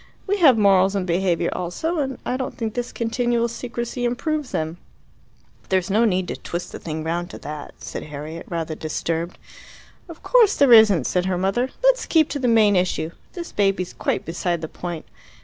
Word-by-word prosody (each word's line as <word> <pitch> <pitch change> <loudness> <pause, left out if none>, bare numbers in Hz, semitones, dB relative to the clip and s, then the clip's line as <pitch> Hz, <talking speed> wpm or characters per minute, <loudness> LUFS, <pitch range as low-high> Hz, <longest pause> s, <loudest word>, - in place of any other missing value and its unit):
We 405 +1 0
have 275 -9 +7
morals 195 -2 +4
and 195 -2 0
behaviour 180 0 +1
also, 310 - -2
and 270 -2 -2
I 250 - -1
don't 260 0 -4
think 220 -2 -3
this 245 0 -3
continual 235 0 0
secrecy 235 +1 -5
improves 290 +4 -1
them." 160 +2 -3 0.9
"There's 190 0 +1
no 220 +4 +4
need 185 -4 +1
to - - -3
twist 175 +1 -5
the - - -7
thing 155 -1 -5
round 170 +2 -2
to - - -8
that," 150 -1 -8
said - - -6
Harriet, 155 +3 -7
rather 165 -2 -3
disturbed. 165 +2 -3 0.7
"Of 335 - -11
course 465 -5 +5
there 275 -4 +6
isn't," 205 - +7
said 180 0 0
her 185 -1 0
mother. 195 +8 0
"Let's - - +3
keep 320 -2 +3
to 285 - -3
the 255 - 0
main 220 -3 +5
issue. 180 -3 0 0.2
This 345 -2 -7
baby's 195 -3 0
quite - - -2
beside 170 0 -2
the 160 - -4
point. 175 0 -6
195 Hz, 185 wpm, -22 LUFS, 175-245 Hz, 0.9 s, have